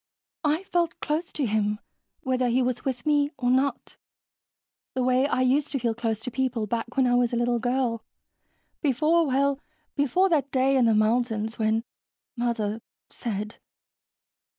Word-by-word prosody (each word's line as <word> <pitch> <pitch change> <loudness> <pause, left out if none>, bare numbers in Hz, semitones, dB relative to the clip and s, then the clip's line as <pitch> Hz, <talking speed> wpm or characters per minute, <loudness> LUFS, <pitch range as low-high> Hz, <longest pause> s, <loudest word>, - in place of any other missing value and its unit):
"I 305 +4 +1
felt 345 -3 -1
close 315 +3 -2
to 290 - -1
him, 210 -1 0 0.4
whether 255 -4 0
he 250 +2 +2
was 245 -1 -2
with 250 -3 -3
me 290 -1 +3
or 245 -2 +1
not, 270 +2 0 1.0
the 255 - 0
way 255 +2 +3
I 255 - 0
used 270 +3 +2
to 275 - 0
feel 235 -1 0
close 225 -2 -2
to 250 - -5
people 250 -3 -1
back 235 +4 -4
when 265 - +4
I 245 - +2
was 245 -1 +2
a - - +2
little 240 0 +1
girl, 245 -1 -1 0.8
before... 310 +4 +2
well, 275 +1 +1 0.4
before 285 +7 +2
that 290 -5 +1
day 270 0 +2
in 255 -2 +4
the 225 -1 +4
mountains... 220 0 +1
when 220 +1 +1 0.5
Mother 230 -3 -1 0.3
said...." 210 -2 -4
250 Hz, 160 wpm, -26 LUFS, 230-275 Hz, 1.0 s, when